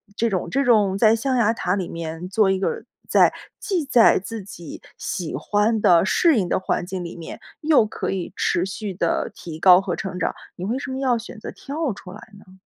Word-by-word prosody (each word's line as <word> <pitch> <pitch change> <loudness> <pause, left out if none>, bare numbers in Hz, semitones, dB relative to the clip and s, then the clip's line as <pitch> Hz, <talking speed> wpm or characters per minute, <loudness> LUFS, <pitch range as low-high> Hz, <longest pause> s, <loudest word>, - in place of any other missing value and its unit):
这 230 +1 +1
种 185 -3 -2
这 275 +1 +1
种 210 -6 +3
在 220 +1 +5
象 260 +3 -1
牙 225 -1 +3
塔 180 -4 -1
里 190 -4 -3
面 165 +1 -6
做 205 -1 +3
一 190 - 0
个 455 - -2 0.3
在 - - +5 0.3
既 355 -7 -1
在 245 -4 +5
自 210 +2 -7
己 170 -5 -10 0.2
喜 175 -4 -4
欢 210 +1 +1
的、 175 +1 +5
适 320 +3 +3
应 185 -4 +1
的 - - 0
环 185 - -2
境 185 -1 -5
里 170 - -7
面， 170 - -9 0.2
又 300 -7 +4
可 210 - -4
以 190 -2 -4
持 175 - 0
续 195 +1 -5
地 - - -1
提 160 -2 -9
高 185 +1 +7
和 180 -3 -3
成 190 -1 -5
长， - - -1 0.2
你 180 - -6
为 230 +6 -1
什 270 -1 -5
么 260 - -4
要 255 -3 +2
选 225 0 -9
择 - - -7
跳 290 -1 -4
出 180 -2 -11
来 210 - -10 0.2
呢？ 190 -1 -18
205 Hz, 235 characters per minute, -22 LUFS, 180-235 Hz, 0.3 s, 高